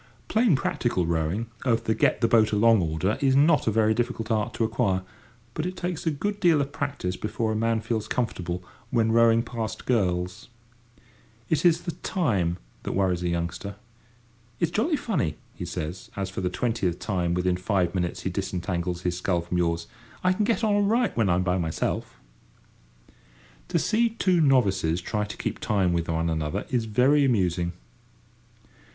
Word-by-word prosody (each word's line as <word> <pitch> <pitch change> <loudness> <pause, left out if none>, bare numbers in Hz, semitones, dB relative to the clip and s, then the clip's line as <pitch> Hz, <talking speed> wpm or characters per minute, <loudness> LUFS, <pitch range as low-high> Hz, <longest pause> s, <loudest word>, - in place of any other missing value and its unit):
Plain 220 - +4
practical 120 -8 0
rowing 85 +6 -1 0.2
of 115 -4 +1
the 110 - +1
get - - +2
the 115 - +4
boat 110 -2 +4
along 110 0 +5
order 80 +5 -1
is 135 -1 +3
not 150 +1 +4
a - - +4
very 110 0 +3
difficult 115 -1 -2
art 110 -2 +1
to - - 0
acquire, 110 -5 0 0.5
but 155 - -2
it 185 0 -6
takes 175 -2 -3
a - - +5
good 200 +8 -2
deal 170 -5 +4
of 140 0 -1
practice 140 -11 -3
before 110 +2 -2
a - - -1
man 115 0 +1
feels 110 -2 -2
comfortable, 90 -8 -2 0.3
when 115 -2 +2
rowing 115 0 +5
past 110 -2 -5
girls. 90 -7 0 1.0
It 160 - +2
is 170 -1 +5
the 170 - -3
"time" 100 - -1 0.2
that - - -4
worries 95 -2 +1
a 90 - -1
youngster. 85 +4 -3 0.8
"It's 170 -1 +1
jolly 275 - +1
funny," 190 - -1 0.2
he - - -6
says, 80 +4 -5
as 95 -1 -3
for 95 - -4
the 90 - 0
twentieth 95 -4 -1
time 90 -2 -1
within 90 0 +1
five 90 -1 0
minutes 90 -2 -2
he 95 - -2
disentangles 90 -2 -3
his 90 -1 -1
sculls 90 -2 -1
from 90 +1 -1
yours; 85 -1 0 0.4
"I 185 0 +4
can 210 +3 0
get 230 +1 0
on 215 -2 +3
all 205 - +3
right 225 +3 +2
when 110 -4 +2
I'm 90 +1 +2
by 90 0 +1
myself!" 80 -2 -2 1.5
To - - 0
see 230 +2 +2
two 185 -6 +2
novices 95 - +3
try 105 +3 -2
to 105 - -8
keep - - -3
time 95 -5 +1
with 85 -1 -1
one 80 0 0
another 80 -2 -2
is 120 -3 +1
very 130 +7 +3
amusing. 90 -8 +1
105 Hz, 180 wpm, -26 LUFS, 90-135 Hz, 1.5 s, along